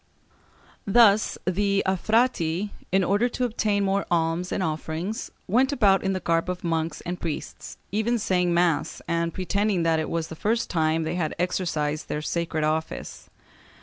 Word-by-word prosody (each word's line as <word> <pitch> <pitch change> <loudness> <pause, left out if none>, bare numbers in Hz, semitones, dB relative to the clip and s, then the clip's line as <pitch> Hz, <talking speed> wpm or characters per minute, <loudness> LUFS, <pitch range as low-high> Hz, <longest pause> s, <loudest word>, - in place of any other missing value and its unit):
Thus 215 0 +5
the 200 +2 +1
affrati, 200 -2 +1 0.2
in 190 +1 +3
order 205 +7 +2
to 250 +1 -1
obtain 215 -3 0
more 195 0 +1
alms 170 +1 0
and 190 - -1
offerings, 160 +5 -3 0.2
went 255 +8 +3
about 205 -8 +4
in 195 0 0
the 185 - -1
garb 165 0 0
of 180 0 -4
monks 165 -2 -1
and 175 +1 -5
priests, 155 -3 -5
even 220 +4 +1
saying 180 -4 +1
mass, 170 -4 +1
and 170 0 0
pretending 195 0 0
that 165 -1 +2
it 155 - -2
was 165 -1 -2
the 160 - -7
first 225 +7 -1
time 160 -1 +1
they 160 +1 -2
had 170 -4 -2
exercised 160 -4 -1
their 150 - -3
sacred 165 -1 -1
office. 155 +1 -3
180 Hz, 160 wpm, -25 LUFS, 165-200 Hz, 0.2 s, Thus